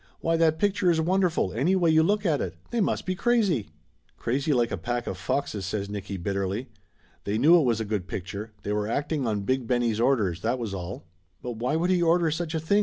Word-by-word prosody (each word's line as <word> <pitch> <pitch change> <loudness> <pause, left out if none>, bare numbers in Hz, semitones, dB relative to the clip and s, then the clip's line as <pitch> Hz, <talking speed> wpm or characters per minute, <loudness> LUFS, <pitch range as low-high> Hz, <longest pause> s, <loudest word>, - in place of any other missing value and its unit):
Why, 165 0 +1
that 160 -1 +3
picture 200 -1 +2
is 165 -2 +3
wonderful, 175 - +1
any 150 - +2
way 175 -3 +3
you 160 0 +5
look 205 +5 +1
at 155 -5 +2
it. - - -4 0.2
They 235 -1 +1
must - - 0
be 185 - 0
crazy 195 - +1 0.2
!" 80 -2 -40
"Crazy 135 +6 -1
like 120 -4 +2
a - - 0
pack 120 +7 -3
of - - -3
foxes!" 100 +2 -2
says 100 +1 -3
Nicky 100 -1 -5
bitterly. 100 +6 -2 0.5
"They 100 +2 -1
knew 155 +9 +6
it 150 - +2
was 115 -3 +1
a 110 - -2
good 100 -3 -2
picture. 100 +4 -5
They 105 - -3
were, 105 0 -1
acting 145 +2 -1
on 105 -2 0
Big 130 +3 -1
Benny's 120 -3 +1
orders, 110 -9 +1
that 120 +3 0
was 115 -5 -4
all!" 90 -1 -6 0.4
"But 120 -2 -5
why 125 +6 0
should 175 +3 +1
he 180 -1 +3
order 170 -1 +3
such 160 +1 -3
a - - +1
thing?" 180 +6 +2
125 Hz, 235 wpm, -26 LUFS, 105-165 Hz, 0.5 s, knew